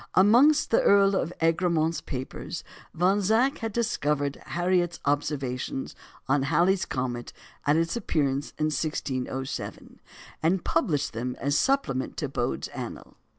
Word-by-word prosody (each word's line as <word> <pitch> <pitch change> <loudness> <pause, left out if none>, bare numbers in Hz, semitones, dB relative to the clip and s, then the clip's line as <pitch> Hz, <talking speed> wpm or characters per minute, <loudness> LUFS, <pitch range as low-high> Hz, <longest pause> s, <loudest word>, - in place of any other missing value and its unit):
Amongst 240 +11 +5
the 230 - +5
Earl 200 0 +5
of 170 -3 -1
Egremont's 165 -1 +2
papers 130 -1 -6 0.3
Von 190 +5 +2
Zach 230 +8 +2
had 225 -1 -3
discovered 150 -11 0
Harriot's 175 0 0
observations 140 -3 -2 0.3
on 135 +1 +3
Halley's 175 +6 +2
comet 125 -4 -3 0.3
at 145 - +5
its 165 0 0
appearance 145 - -1
in 155 - +1
1607, 135 -3 -4 0.4
and 175 +3 +1
published 145 - 0
them 125 +3 -3
as 140 +1 0
a - - +3
supplement 145 - 0
to 145 - -1
Bode's 125 -2 -2
Annual. - - -7
160 Hz, 130 wpm, -27 LUFS, 135-190 Hz, 0.4 s, Amongst